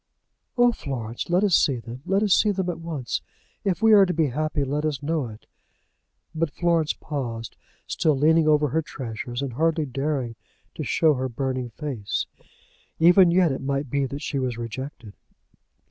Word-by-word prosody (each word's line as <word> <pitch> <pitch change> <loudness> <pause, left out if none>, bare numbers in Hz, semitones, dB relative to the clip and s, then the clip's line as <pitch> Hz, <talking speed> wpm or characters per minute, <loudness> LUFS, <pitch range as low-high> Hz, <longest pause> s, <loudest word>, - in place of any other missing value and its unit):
"Oh, 245 0 +5
Florence, 120 - -5
let 180 +3 +3
us 200 -3 +2
see 140 - +3
them; 120 +2 -9
let 195 +2 +2
us 205 -3 +4
see 215 - +4
them 190 -3 0
at 170 - -8
once. 155 -7 -3 0.4
If 195 +2 -1
we 225 -1 +7
are 200 -2 +7
to 180 - 0
be 155 -3 +2
happy 155 +2 -1
let 145 +2 -2
us 150 -3 -2
know 155 -3 -1
it." 110 -1 -12 0.9
But 160 0 0
Florence 165 -1 +1
paused, 120 -7 -5 0.3
still 155 -4 +1
leaning 160 +3 +4
over 150 -1 +4
her 160 +5 +1
treasures, 120 -3 -5
and 135 -3 -4
hardly 160 +3 +1
daring 135 -3 -2 0.4
to - - -5
show 160 -2 +3
her 130 -1 -2
burning 130 0 -3
face. 125 -5 -3 0.7
Even 175 +2 +6
yet 175 -2 +4
it 135 - -3
might 140 -1 -2
be 140 -1 +1
that 140 +3 -6
she 140 - -2
was 125 -3 -2
rejected. 120 -1 -7
145 Hz, 175 wpm, -24 LUFS, 130-165 Hz, 0.9 s, we